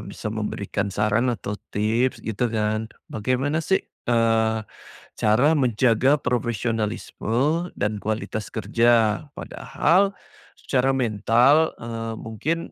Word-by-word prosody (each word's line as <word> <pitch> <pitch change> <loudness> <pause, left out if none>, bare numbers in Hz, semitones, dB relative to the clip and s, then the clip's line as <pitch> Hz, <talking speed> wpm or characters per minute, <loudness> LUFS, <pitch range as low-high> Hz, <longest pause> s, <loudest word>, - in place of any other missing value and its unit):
bisa 110 - -6
memberikan 105 -1 -3
saran 105 +5 +1
atau 105 -3 -4 0.2
tips 115 +5 +1
gitu 110 +2 -1
kan, 110 0 -1 0.2
bagaimana 130 +8 0
sih, 190 +4 +1 0.3
eee, 115 -1 +2 0.6
cara 110 +7 +3
menjaga 130 +1 +3
profesionalisme 120 - -1
dan 105 +1 0
kualitas 110 -1 -3
kerja, 115 0 +2
padahal 195 +3 +1 0.5
secara 135 0 +1
mental, 125 +5 +3
eee, 115 0 -5
mungkin 115 +9 -2
115 Hz, 100 wpm, -24 LUFS, 110-130 Hz, 0.6 s, cara